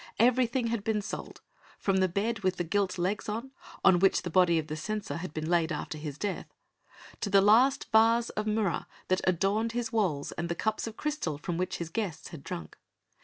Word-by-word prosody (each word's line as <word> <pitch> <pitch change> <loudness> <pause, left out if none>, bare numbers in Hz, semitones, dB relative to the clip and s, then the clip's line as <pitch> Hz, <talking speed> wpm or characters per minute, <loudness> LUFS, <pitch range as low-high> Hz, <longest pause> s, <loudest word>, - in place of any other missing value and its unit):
Everything 250 +1 +3
had 230 -3 -1
been 220 0 +1
sold, 205 - -6 0.4
from 195 -1 +1
the 190 0 +3
bed 205 +5 -1
with 185 -2 0
the 175 - -2
gilt 190 +2 0
legs 190 +5 -1
on 230 +5 -4 0.5
which 195 +1 +3
the 175 - -4
body 175 -1 +4
of 160 - -1
the 155 0 -5
censor 205 +6 -3
had 170 -1 -5
been 155 0 -4
laid 170 -1 +2
after 155 - -4
his 150 -2 -6
death, 205 +2 -3 0.7
to 205 - -2
the 200 0 +6
last 230 +7 +5
vase 230 +2 +4
of 215 0 -3
murra 210 -4 0 0.2
that 185 0 +2
adorned 195 +5 +1
his 235 -1 -2
walls 175 -11 0
and 170 +1 -4
the 170 - -1
cups 220 +5 -1
of 220 - -7
crystal 295 - -2
from 170 +3 -4
which 180 +2 -2
his 170 -1 -5
guests 195 -5 -3
had 160 -5 -10
drunk. 80 - -7
195 Hz, 205 wpm, -29 LUFS, 170-225 Hz, 0.7 s, the